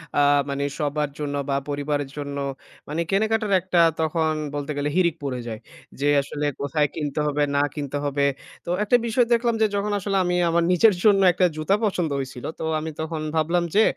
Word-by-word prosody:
অ্যা 145 - +4 0.3
মানে 140 0 -2 0.2
সবার 150 0 -1
জন্য 145 -1 -3
বা 135 - +1
পরিবারের 145 -1 -2
জন্য 140 -1 -4 0.5
মানে 160 +3 -1
কেনাকাটার 215 +1 +1
একটা 180 -1 +2 0.2
তখন 160 0 +1 0.2
বলতে 145 +1 -3
গেলে 145 +1 0
হিড়িক 175 -3 +3
পড়ে 130 -3 -3
যায়। 110 -2 -5 0.4
যে 145 - +1
আসলে 145 +1 -4 0.2
কোথায় 145 +1 +1
কিনতে 150 -1 -3
হবে, 150 0 +1
না 140 - +3
কিনতে 145 -1 -3
হবে? 140 0 +1 0.4
তো - - -6
একটা 210 +4 +3
বিষয় 240 +2 +3
দেখলাম 235 0 +2
যে 220 - +5
যখন 205 +1 -1
আসলে 195 0 -1
আমি 180 0 0
আমার 170 +1 +2
নিজের 205 +4 +5
জন্য 205 -2 +5
একটা 180 +1 +3
জুতা 155 +5 +1
পছন্দ 180 -6 0
হইছিল। 130 -2 -6
তো - - -4 0.2
আমি 160 +1 -4
তখন 160 0 -4
ভাবলাম 170 +3 +2
যে, 215 - +6
155 Hz, 190 wpm, -24 LUFS, 145-190 Hz, 0.5 s, যে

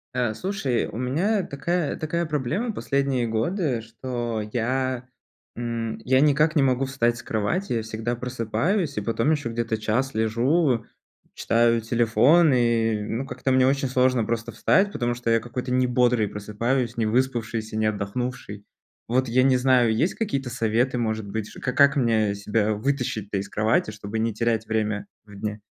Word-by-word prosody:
А, 120 -4 0
слушай, 160 - -1
у 110 - -8
меня 170 - +1
такая 170 +1 -2
такая 170 +2 -2
проблема 150 - -1
последние 140 - 0
годы, 120 - -1
что 115 -1 -4
я 130 +1 -1 0.5
м, 115 -1 -3
я 130 +1 +4
никак 150 +2 +3
не 150 - +4
могу 135 0 +2
встать 120 -3 0
с - - -9
кровати. 120 - -1
Я 115 - 0
всегда 110 +2 -3
просыпаюсь 125 - -1
и - - 0
потом 115 +6 0
ещё 145 -6 -1
где-то 115 -1 -2
час 125 +5 -1
лежу, 120 +4 +1 0.5
читаю 115 0 +2
телефон, 120 +8 +4
и, 115 -3 +2
ну, 115 +5 -3
как-то 135 - -2
мне 130 0 +4
очень 135 0 +1
сложно 125 -1 +2
просто 115 +1 -3
встать, 200 +1 +2
потому 120 -8 -1
что 120 -1 -2
я 115 - +4
какой-то 125 +2 -5
небодрый 125 -3 +2
просыпаюсь, 115 +4 -2
невыспавшийся, 115 -1 -1
неотдохнувший. 110 0 -3 0.4
Вот 130 +2 +1
я 120 +2 +3
не 130 0 +4
знаю, 125 -3 +3
есть 160 +11 +1
какие-то 140 - -2
советы, 120 +2 0
может 110 -2 -2
быть 110 +1 -4
же, - - -11
ка 125 - -2
как 140 0 +5
мне 110 -6 +2
себя 105 +1 0
вытащить-то 110 -4 -2
из 95 - -4
кровати, 110 0 +1
чтобы 105 +1 -5
не 115 +1 0
терять 115 0 -1
время 110 -2 -1 0.2
в 105 -1 -14
дне? 105 +1 -4
120 Hz, 160 wpm, -24 LUFS, 110-135 Hz, 0.5 s, как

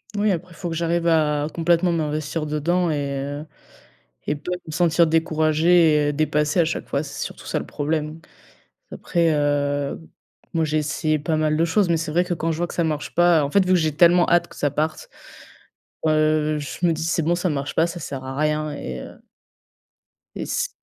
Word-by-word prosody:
Moui, 205 0 +2
après 180 0 -4
il - - -17
faut 175 -1 -5
que 165 - -4
j'arrive 170 +1 0
à 150 -2 +2
complètement 170 +1 +2
m'investir 155 -1 -2
dedans 170 +4 0
et 140 -2 -2
heu, 145 +2 -5 0.8
et 150 - 0
pas 150 +5 -6
me 155 - -7
sentir 170 0 +3
découragée 160 -1 +3
et - - 0
dépassée 150 +2 +1
à - - +4
chaque 165 - -3
fois, 140 - -1
c'est 145 - -7
surtout - - -7
ça - - -1
le - - -6
problème. 155 +1 -3 0.7
Après, 170 -2 0
heu, 145 -1 0 0.5
moi, 165 -2 +1
j'ai 155 0 0
essayé 155 +1 -1
pas 155 +2 -1
mal 155 0 +1
de 165 - +3
choses, 180 +3 +1
mais 165 - +3
c'est 160 -1 -4
vrai 175 +3 +2
que 180 - -2
quand 165 0 -1
je 160 - -3
vois 175 - -1
que - - -9
ça 170 - 0
marche 150 -2 -3
pas, 175 -3 +4
en 140 - -2
fait, 200 - +4
vu 185 - +3
que 180 - +4
j'ai 155 -2 0
tellement 175 +1 +5
hâte 170 0 +3
que - - -16
ça 145 -2 0
parte, 155 +2 -2 1.0
heu, 155 0 +2
je 145 +5 -4
me - - +3
dis: 160 - -4
«C'est 165 0 +1
bon, 170 +2 +2
ça 175 0 -1
marche 140 -1 -3
pas, 165 +2 +3
ça 175 0 -6
sert 135 -3 -6
à 135 0 -6
rien» 150 0 0
et 65 -1 -6
heu - - -11 1.2
et - - -4
c'est - - -1
155 Hz, 215 wpm, -22 LUFS, 150-170 Hz, 1.2 s, tellement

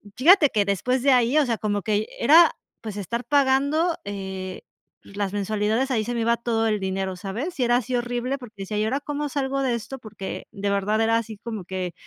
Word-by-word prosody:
fíjate 315 +4 +6
que 210 - +2
después 245 +6 0
de 280 - +5
ahí, 250 +3 +3
o 300 - +3
sea, 235 -3 -1
como 205 -1 -1
que 215 +2 0
era, 320 +6 +6 0.3
pues 215 -3 -6
estar 235 +5 -4
pagando, 285 +4 +2
eh, 190 -2 -6 0.4
las 200 -1 -4
mensualidades, 215 +5 0
ahí 225 -4 +1
se 240 - -3
me 235 - -1
iba 235 +1 +2
todo 230 -1 0
el 210 -1 0
dinero, 190 0 -2
¿sabes? 230 - -5
Y - - +3
era 240 0 +3
así 255 +1 -3
horrible, 245 +2 -2
porque 245 -3 -11
decía, 195 +2 -4
¿y 210 - +1
ahora 265 +6 -1
cómo 295 0 -3
salgo 275 -1 -1
de 260 -2 +1
esto? 265 +4 -7
Porque 215 -4 -7
de 200 0 -3
verdad 205 +2 +1
era 225 0 +3
así 225 -2 -5
como 215 -3 -6
que 185 -1 -4
230 Hz, 215 wpm, -24 LUFS, 205-265 Hz, 0.4 s, fíjate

